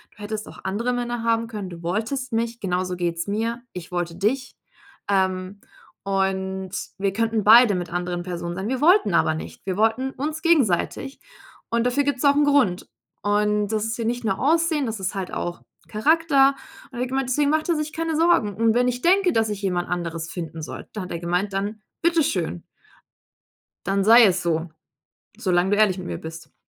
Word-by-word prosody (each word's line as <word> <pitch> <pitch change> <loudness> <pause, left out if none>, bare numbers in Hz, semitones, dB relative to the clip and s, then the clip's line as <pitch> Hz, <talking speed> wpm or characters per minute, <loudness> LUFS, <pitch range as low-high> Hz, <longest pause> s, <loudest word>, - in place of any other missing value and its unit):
Du 210 - -11
hättest 215 +1 -5
auch - - -12
andere 230 +6 -1
Männer 240 -1 -3
haben 230 0 +1
können. 210 -4 -6
Du 170 -1 -10
wolltest 225 +9 -2
mich. 230 +1 -1
Genauso 180 -1 -1
geht's 170 -1 -2
mir. 225 +3 -2
Ich 180 -1 -8
wollte 175 -1 -2
dich. 255 +8 -1 0.5
Ähm, 190 0 0 0.4
und 190 -1 -1 0.3
wir 195 0 -1
könnten 225 0 0
beide 225 -1 +7
mit 175 -2 -4
anderen 175 0 -3
Personen 175 -1 -5
sein, 190 +4 -3
wir 260 0 -1
wollten 345 - +4
aber 160 -1 +3
nicht. 160 - -9
Wir 185 - -2
wollten 225 +5 +1
uns 305 +4 -4
gegenseitig. 275 - +1 0.5
Und 235 0 +1
dafür 250 +3 +2
gibt's 285 -3 -1
auch 280 0 +5
'n 295 0 +4
Grund. 270 -11 +2 0.4
Und 210 0 +1
das 215 -1 -1
ist 225 +1 -3
hier 230 - -3
nicht 240 +2 -2
nur 195 -3 0
Aussehen, 320 0 +2
das 220 -2 -4
ist 190 +1 -2
halt 190 -2 -4
auch 175 0 -4 0.3
Charakter.“ 280 +3 +3 0.3
Und - - -22
da - - -8
hat - - -2
er - - -2
gemeint, 265 0 -1
deswegen 285 +2 +2
macht 310 0 +1
er 340 - +3
sich 305 0 -3
keine 325 -1 -2
Sorgen. 315 - +3
Und 225 0 +3
wenn 245 +1 +3
ich 245 0 -2
denke, 370 +3 +3
dass 225 -1 +2
ich 205 -1 -4
jemand 180 -3 -1
anderes 165 -2 -3
finden 165 -2 -6
soll, - - -7
da 210 - -4
hat 180 - -7
er 170 - -3
gemeint: 180 +4 -1
„Dann 205 +2 -3 0.2
bitteschön" 280 - +1 1.2
„dann 195 +2 +1
sei 230 +3 +8
es 185 -2 +2
so. 165 -1 -1 0.7
Solange 185 -4 +1
du 205 - +3
ehrlich 205 -3 +3
mit 180 - -6
mir - - -4
bist.“ 160 0 -10
210 Hz, 200 wpm, -23 LUFS, 185-250 Hz, 1.2 s, sei